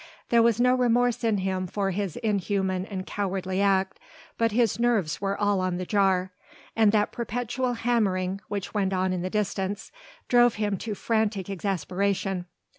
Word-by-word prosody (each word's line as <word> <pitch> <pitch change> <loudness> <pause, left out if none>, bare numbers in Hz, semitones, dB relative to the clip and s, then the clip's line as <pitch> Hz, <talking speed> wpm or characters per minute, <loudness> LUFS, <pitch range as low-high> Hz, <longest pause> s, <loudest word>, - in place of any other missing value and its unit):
There 235 -1 +5
was 230 -1 +3
no 250 +1 +4
remorse 245 -1 +2
in 225 -3 +2
him 185 -1 -2
for 195 +1 -1
his 195 -2 -3
inhuman 195 -2 0
and 190 -2 -5
cowardly 190 -1 -2
act, 195 -1 +1 0.4
but 230 -1 +1
his 230 0 +1
nerves 225 -11 +1
were 195 0 -1
all 205 -1 +2
on 185 -1 -1
the 185 - -4
jar, 190 -2 +2 0.4
and 220 -2 +5
that 210 -1 +2
perpetual 245 +2 -2
hammering 200 -6 0
which 200 -2 -4
went 195 -2 0
on 185 0 +1
in 180 - -2
the 185 - -2
distance 200 -1 -2 0.4
drove 240 -1 +5
him 205 -1 -1
to 215 +2 -4
frantic 210 -3 -1
exasperation. 195 0 -1
200 Hz, 165 wpm, -26 LUFS, 190-225 Hz, 0.4 s, There